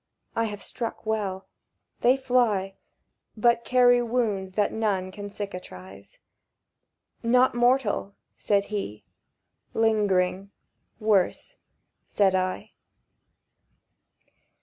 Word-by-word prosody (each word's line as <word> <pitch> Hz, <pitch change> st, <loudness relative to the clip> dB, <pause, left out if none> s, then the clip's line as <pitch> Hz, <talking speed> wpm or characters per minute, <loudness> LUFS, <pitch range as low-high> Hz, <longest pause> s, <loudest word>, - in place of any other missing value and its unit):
"I 230 Hz, -, +1 dB
have 205 Hz, -2 st, -5 dB
struck 230 Hz, -1 st, -5 dB
well. 200 Hz, -3 st, -2 dB, 0.5 s
They 250 Hz, +3 st, +4 dB
fly, 240 Hz, -7 st, +1 dB, 0.6 s
But 235 Hz, +1 st, +3 dB
carry 245 Hz, 0 st, +4 dB
wounds 220 Hz, -6 st, -1 dB
that 205 Hz, +1 st, +1 dB
none 200 Hz, -4 st, -1 dB
can 205 Hz, +1 st, -7 dB
cicatrize." 100 Hz, -, -9 dB, 1.0 s
—"Not 250 Hz, +2 st, +3 dB
mortal?" 240 Hz, -4 st, +1 dB, 0.2 s
said 200 Hz, -1 st, +1 dB
he. 105 Hz, -, -4 dB, 0.7 s
"Lingering—worse," 205 Hz, -, 0 dB, 0.5 s
said 195 Hz, -2 st, +2 dB
I. 185 Hz, 0 st, -2 dB
210 Hz, 80 wpm, -26 LUFS, 190-235 Hz, 1.0 s, They